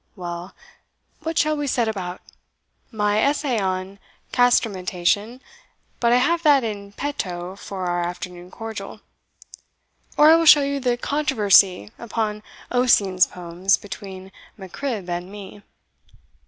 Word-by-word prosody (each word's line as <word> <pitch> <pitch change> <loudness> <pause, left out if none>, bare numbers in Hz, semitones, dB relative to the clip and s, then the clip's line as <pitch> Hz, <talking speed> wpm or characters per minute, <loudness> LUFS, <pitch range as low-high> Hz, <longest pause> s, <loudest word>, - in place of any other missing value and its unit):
Well, 175 -1 -7 0.7
what 325 +1 -4
shall 305 0 +2
we 290 -1 -3
set 240 -3 +1
about? 185 -4 -4 0.7
my 210 -2 +1
Essay 280 -2 +1
on 190 0 -3 0.3
Castrametation 210 -1 +1 0.6
but 235 -1 +2
I - - +5
have 335 +7 +2
that 290 -5 +4
in 200 -2 -5
petto 185 -10 -4
for 195 -2 -6
our 175 0 -1
afternoon 175 0 -6
cordial; 225 +2 -8 1.2
or 300 +1 +7
I - - +8
will 330 -1 +1
show 295 -1 +8
you 280 0 -1
the 245 -2 0
controversy 210 - +3
upon 220 -2 -3 0.3
Ossian's 205 -7 +3
Poems 180 +2 0
between 190 -1 -9 0.3
Mac 190 -3 -11
Cribb 235 -10 -4
and 175 +1 -4
me. 205 0 -10
205 Hz, 125 wpm, -22 LUFS, 185-250 Hz, 1.2 s, I